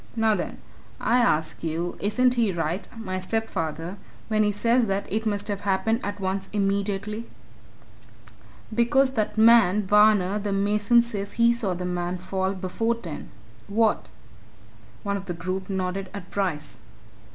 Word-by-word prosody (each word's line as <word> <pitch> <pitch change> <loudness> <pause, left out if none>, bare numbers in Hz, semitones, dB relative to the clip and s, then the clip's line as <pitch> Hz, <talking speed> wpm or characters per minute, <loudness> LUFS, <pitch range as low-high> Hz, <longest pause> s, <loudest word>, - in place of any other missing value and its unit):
Now, 225 -1 +3
then, - - -3 0.4
I 245 - +2
ask 160 -12 +1
you 165 +2 -2
isn't 250 +5 +2
he 230 -5 +2
right, 175 +2 -2
my 185 -4 -3
stepfather, 185 -4 -2 0.3
when 215 -1 +2
he 210 -1 +3
says 230 +3 +2
that 195 0 -1
it 220 +1 0
must 205 -1 -1
have 200 -2 -2
happened 205 +3 +1
at 205 0 -4
once 190 0 -2
immediately? 200 +2 -1 1.4
"Because 260 +4 +3
that 220 -4 -1
man, 220 -3 +6
Varner, 210 -1 +4
the 205 -1 -2
mason, 210 +4 +3
says 205 -4 -4
he 235 0 +4
saw 210 -6 -1
the 180 +1 -4
man 180 0 -2
fall 190 +1 -2
before 200 +5 -1
ten. 175 -10 -8 0.4
What?" 220 +1 +1 0.9
One 200 0 -1
of 195 0 -9
the 175 - -3
group 185 +3 -4
nodded 190 0 -2
at 185 -3 -8
Bryce. 150 - -2
200 Hz, 150 wpm, -25 LUFS, 185-220 Hz, 1.4 s, man